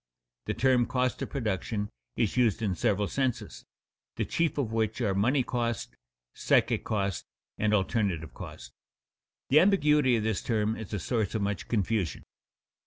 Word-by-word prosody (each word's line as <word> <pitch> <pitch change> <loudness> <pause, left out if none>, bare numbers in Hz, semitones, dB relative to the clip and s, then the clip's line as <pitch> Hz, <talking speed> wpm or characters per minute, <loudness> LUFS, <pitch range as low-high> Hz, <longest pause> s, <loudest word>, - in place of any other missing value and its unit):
_The - - -2
term 125 -2 +3
cost 125 -1 0
of - - -3
production 105 - -2 0.3
is 110 - 0
used 115 -3 +2
in 100 -3 +1
several 100 +3 +1
senses, 115 - -2 0.5
the - - -1
chief 165 -2 0
of 130 -6 -1
which 110 +1 0
are 105 -6 +1
money 125 +8 +2
cost, 120 -3 -2 0.4
psychic - - +2
cost, 100 -3 -2 0.3
and 105 0 +2
alternative 95 - 0
cost._ - - -9 0.8
The 145 - +7
ambiguity 150 -9 +4
of 110 - 0
this 110 -2 0
term 110 -1 0
is 110 -3 -8
a 105 - -2
source 110 +3 -1
of 105 - 0
much 100 -2 -2
confusion. 105 - -1
110 Hz, 155 wpm, -29 LUFS, 100-125 Hz, 0.8 s, The